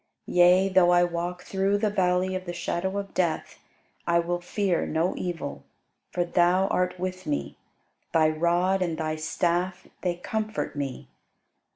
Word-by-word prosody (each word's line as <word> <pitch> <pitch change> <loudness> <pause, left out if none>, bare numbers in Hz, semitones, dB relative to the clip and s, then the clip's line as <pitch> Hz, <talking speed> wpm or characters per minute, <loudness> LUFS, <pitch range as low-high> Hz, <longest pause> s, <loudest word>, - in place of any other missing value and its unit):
Yea, 180 +2 +5
though 185 -2 +4
I 175 0 +5
walk 175 +1 -3
through 195 +1 +1
the 210 0 0
valley 185 -1 +1
of 185 0 -4
the 175 - -4
shadow 175 +2 -2
of 200 -1 -5
death, 170 -4 -1 0.5
I 170 0 +4
will 175 +1 0
fear 185 0 0
no 165 +3 0
evil: 165 -6 -4 0.5
for 175 - 0
thou 175 +2 +3
art 180 0 0
with 185 0 -4
me; 70 0 -2 0.6
Thy 160 -1 +4
rod 175 +4 +1
and 170 -3 -1
thy 155 -1 -2
staff 175 +3 -1
they 180 -2 0
comfort 215 +2 -3
me. 140 -3 -4
175 Hz, 155 wpm, -26 LUFS, 170-185 Hz, 0.6 s, Yea